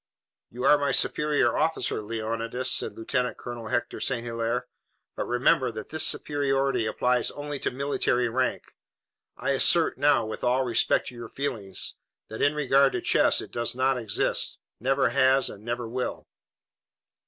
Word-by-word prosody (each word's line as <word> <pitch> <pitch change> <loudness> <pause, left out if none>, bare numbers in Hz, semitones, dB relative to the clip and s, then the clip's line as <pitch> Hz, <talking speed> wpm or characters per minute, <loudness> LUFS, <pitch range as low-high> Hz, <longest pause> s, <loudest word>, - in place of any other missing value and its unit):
"You 125 +2 -7
are 145 +2 +5
my 145 -1 0
superior 145 -2 +2
officer, 155 -8 0
Leonidas," 115 +3 -2
said - - +1
Lieutenant 125 +2 -2
Colonel 120 -2 -7
Hector 120 - -2
St. 120 -3 -2
Hilaire, 115 +1 -2 0.5
"but - - -3
remember 125 +1 +2
that 110 -1 -8
this 155 - -1
superiority 135 -4 0
applies 125 +2 +1
only 145 -1 -6
to - - -1
military 125 -2 0
rank. 130 +2 -1 0.7
I - - -1
assert 160 +3 +3
now, 140 -5 +3
with 110 - -6
all 125 +2 +2
respect 115 -3 +1
to 125 - -13
your 120 -1 -8
feelings, 115 -9 -2 0.3
that 110 - -6
in 145 +1 +3
regard 140 -1 +3
to - - -2
chess - - +3
it - - -10
does 120 0 -2
not 130 +1 +2
exist, 110 -4 0 0.2
never 135 +3 +2
has 135 0 +3
and 105 - -12
never 120 0 -3
will." 125 +2 -4
125 Hz, 155 wpm, -26 LUFS, 115-140 Hz, 0.7 s, are